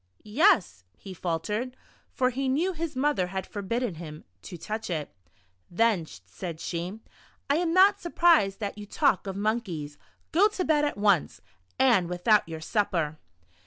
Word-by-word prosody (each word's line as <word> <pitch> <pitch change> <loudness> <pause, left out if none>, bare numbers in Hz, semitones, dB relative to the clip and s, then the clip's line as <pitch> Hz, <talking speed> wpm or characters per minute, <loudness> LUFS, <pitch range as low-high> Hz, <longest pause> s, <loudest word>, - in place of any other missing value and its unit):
"Yes," 215 - +2
he 190 - -9
faltered 210 +9 -3 0.3
(for 255 -1 +1
he 265 +1 -2
knew 335 +8 +1
his 325 -2 -4
mother 260 -9 +1
had 190 0 -4
forbidden 225 +2 -3
him 155 -2 -9 0.2
to 175 - -9
touch 215 +7 -5
it). 155 -4 -3 0.6
"Then," 190 -3 +1 0.2
said 160 - -7
she, 175 +6 -4 0.5
"I 285 - +3
am 340 -1 0
not 390 +3 +5
surprised 335 - +3
that 205 0 -4
you 205 - -8
talk 245 - +1
of 190 - -4
monkeys. 195 -9 -3 0.3
Go 380 +6 +5
to 400 -4 -3
bed 300 -2 +3
at 290 - -2
once, 200 -6 +2 0.4
and 230 -10 +3
Avithout 180 +4 +3
your 160 -1 -7
supper." 160 -5 -1
210 Hz, 155 wpm, -27 LUFS, 175-275 Hz, 0.6 s, not